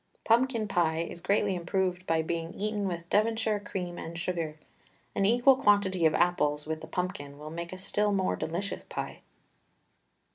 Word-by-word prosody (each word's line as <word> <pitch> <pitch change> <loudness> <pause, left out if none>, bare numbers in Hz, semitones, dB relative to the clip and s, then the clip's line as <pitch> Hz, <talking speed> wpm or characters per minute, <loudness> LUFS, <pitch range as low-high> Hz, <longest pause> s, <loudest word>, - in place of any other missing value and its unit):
Pumpkin 230 -1 +3
pie 165 -4 +1
is 170 0 -6
greatly 200 +1 +2
unproved 180 +1 -1
by 160 -1 +2
being 165 +1 -3
eaten 210 -1 -1
with 170 -2 -4
Devonshire 220 0 +2
cream 180 -3 -5
and 165 +1 -6
sugar. 170 -4 -2 0.6
An 195 -1 +2
equal 245 +4 +6
quantity 200 -8 +4
of 155 - +1
apples 150 -4 +2
with 160 0 -3
the - - -8
pumpkin 180 -6 -4
will 150 +1 -8
make 170 +1 -5
a 185 - -6
still 205 +2 0
more 190 -2 +1
delicious 180 +5 -3
pie. - - -6
180 Hz, 160 wpm, -29 LUFS, 165-205 Hz, 0.6 s, equal